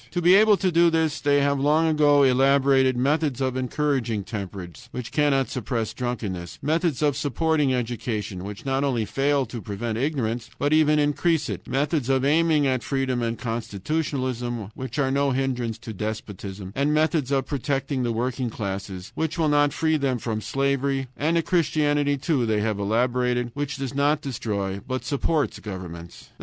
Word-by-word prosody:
To 175 Hz, -, -2 dB
be 175 Hz, +1 st, +5 dB
able 210 Hz, +1 st, +6 dB
to 185 Hz, -1 st, +1 dB
do 170 Hz, +1 st, +5 dB
this 160 Hz, -2 st, 0 dB
they 145 Hz, 0 st, +3 dB
have 140 Hz, 0 st, +1 dB
long 150 Hz, +4 st, +3 dB
ago 145 Hz, -2 st, +4 dB
elaborated 135 Hz, 0 st, +4 dB
methods 145 Hz, +1 st, +1 dB
encouraging 130 Hz, -3 st, -1 dB
temperance, 100 Hz, +2 st, -7 dB
which 125 Hz, -2 st, -6 dB
cannot 140 Hz, -3 st, +2 dB
suppress 115 Hz, -3 st, -3 dB
drunkenness; 110 Hz, -8 st, -4 dB
methods 160 Hz, -1 st, 0 dB
of 145 Hz, -2 st, +2 dB
supporting 150 Hz, 0 st, +1 dB
education, 115 Hz, -6 st, -3 dB
which 100 Hz, +4 st, -8 dB
not 135 Hz, 0 st, 0 dB
only 125 Hz, -6 st, 0 dB
fail 140 Hz, +5 st, +1 dB
to 115 Hz, 0 st, -7 dB
prevent 110 Hz, +3 st, -4 dB
ignorance, 125 Hz, -5 st, -1 dB
but 145 Hz, +1 st, +1 dB
even 155 Hz, -1 st, +4 dB
increase 150 Hz, +1 st, +1 dB
it; -, -, -6 dB
methods 140 Hz, -1 st, 0 dB
of 135 Hz, 0 st, +2 dB
aiming 155 Hz, 0 st, +3 dB
at 130 Hz, -2 st, +1 dB
freedom 135 Hz, -2 st, -1 dB
and 115 Hz, 0 st, -1 dB
constitutionalism, 120 Hz, 0 st, -3 dB
which 130 Hz, +2 st, -6 dB
are 135 Hz, -2 st, +1 dB
no 140 Hz, +1 st, +2 dB
hindrance 125 Hz, -4 st, -1 dB
to 110 Hz, -1 st, -8 dB
despotism; 100 Hz, -2 st, -6 dB
methods 150 Hz, 0 st, +1 dB
of 135 Hz, -1 st, +1 dB
protecting 140 Hz, -1 st, -2 dB
the 120 Hz, -1 st, 0 dB
working 125 Hz, +2 st, -2 dB
classes, 95 Hz, -3 st, -5 dB
which 160 Hz, +2 st, -2 dB
will 160 Hz, -2 st, +2 dB
not 145 Hz, 0 st, +3 dB
free 160 Hz, +2 st, +1 dB
them 135 Hz, -3 st, 0 dB
from 110 Hz, -2 st, -3 dB
slavery; 135 Hz, +3 st, 0 dB
and 155 Hz, +6 st, +1 dB
a 165 Hz, -, +2 dB
Christianity, 145 Hz, -4 st, +1 dB
too, 135 Hz, -4 st, 0 dB
they 110 Hz, -1 st, +1 dB
have 105 Hz, -1 st, -1 dB
elaborated, 120 Hz, +3 st, 0 dB
which 145 Hz, -1 st, -3 dB
does 135 Hz, -1 st, -4 dB
not 145 Hz, +2 st, +2 dB
destroy, 100 Hz, -7 st, -3 dB
but 130 Hz, -1 st, -3 dB
supports 145 Hz, -1 st, 0 dB
governments. 90 Hz, -4 st, -8 dB
135 Hz, 165 wpm, -24 LUFS, 115-145 Hz, -, able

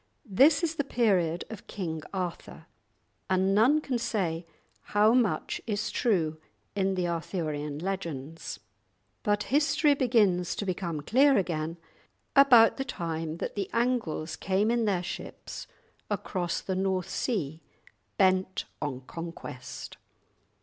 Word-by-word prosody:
This 275 Hz, -, +5 dB
is 330 Hz, -1 st, +1 dB
the 285 Hz, -, +1 dB
period 190 Hz, -10 st, +1 dB
of 215 Hz, -2 st, -9 dB
King 165 Hz, -6 st, -4 dB
Arthur, 180 Hz, -3 st, -5 dB, 0.6 s
and 190 Hz, +1 st, +3 dB
none 245 Hz, +9 st, +5 dB
can 255 Hz, -5 st, -2 dB
say 175 Hz, -8 st, -1 dB, 0.5 s
how 215 Hz, +2 st, +6 dB
much 245 Hz, -4 st, +1 dB
is 210 Hz, -1 st, -1 dB
true 160 Hz, -9 st, +1 dB, 0.4 s
in 195 Hz, -1 st, +1 dB
the 180 Hz, -1 st, 0 dB
Arthurian 155 Hz, -4 st, -3 dB
legends. 165 Hz, -4 st, -4 dB, 0.6 s
But 205 Hz, 0 st, +1 dB
history 295 Hz, 0 st, +4 dB
begins 215 Hz, -10 st, +2 dB
to 205 Hz, -, -3 dB
become 175 Hz, -4 st, -2 dB
clear 270 Hz, -, +4 dB
again 165 Hz, -3 st, -1 dB, 0.6 s
about 250 Hz, -5 st, +7 dB
the 270 Hz, -, -1 dB
time 165 Hz, -, -4 dB
that -, -, -4 dB
the 200 Hz, -2 st, -3 dB
Angles 230 Hz, -10 st, 0 dB
came 195 Hz, +4 st, +1 dB
in 235 Hz, -1 st, +2 dB
their 190 Hz, -4 st, +1 dB
ships -, -, -7 dB, 0.4 s
across 175 Hz, -3 st, -2 dB
the 190 Hz, -, -3 dB
North 190 Hz, -1 st, 0 dB
Sea, 165 Hz, -, -2 dB, 0.6 s
bent 190 Hz, -1 st, +2 dB, 0.2 s
on 135 Hz, -4 st, -3 dB
conquest. 150 Hz, -4 st, -8 dB
190 Hz, 125 wpm, -29 LUFS, 165-225 Hz, 0.6 s, about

